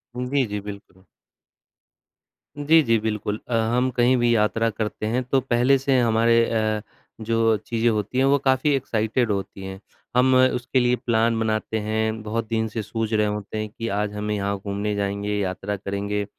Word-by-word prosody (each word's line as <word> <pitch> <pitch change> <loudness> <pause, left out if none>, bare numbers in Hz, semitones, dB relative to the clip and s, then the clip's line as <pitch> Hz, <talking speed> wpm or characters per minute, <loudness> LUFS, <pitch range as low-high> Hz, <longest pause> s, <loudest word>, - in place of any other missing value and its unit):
जी, 125 +2 0
जी, 105 0 -4
बिल्कुल। 100 -2 -10 1.5
जी, 155 +3 +5
जी, 115 -2 +3
बिल्कुल 105 -1 -3
अ, 120 - -4 0.2
हम 130 +1 +2
कहीं 125 +1 +3
भी 120 0 +2
यात्रा 115 +1 +1
करते 110 0 -4
हैं 125 +3 0
तो 135 +2 +1
पहले 125 +2 +3
से 135 -1 +2
हमारे 115 0 +3
अ, 110 -2 0 0.4
जो 115 0 +2
चीज़ें 115 +2 0
होती 110 +3 -2
हैं 135 - +4
वो 140 +1 +4
काफ़ी 135 +2 +2
एक्साइटेड 115 -2 0
होती 95 -1 -4
हैं। 95 0 -7 0.4
हम 130 +1 +4
उसके 130 0 +2
लिए 125 0 +3
प्लान 115 -1 +1
बनाते 110 0 -1
हैं 110 +1 -1
बहुत 110 +1 -3
दिन 110 -1 0
से 110 +1 -4
सूझ 110 +1 -3
रहे 105 -1 +3
होते 105 +1 -4
हैं 110 0 -3
कि 115 +2 -6
आज 105 -1 -2
हम 105 +1 -4
यहाँ 100 -1 -1
घूमने 100 +1 -3
जाएँगे 100 +1 -2
यात्रा, 100 +1 -3
करेंगे 100 +1 -3
110 Hz, 175 wpm, -23 LUFS, 105-120 Hz, 1.5 s, जी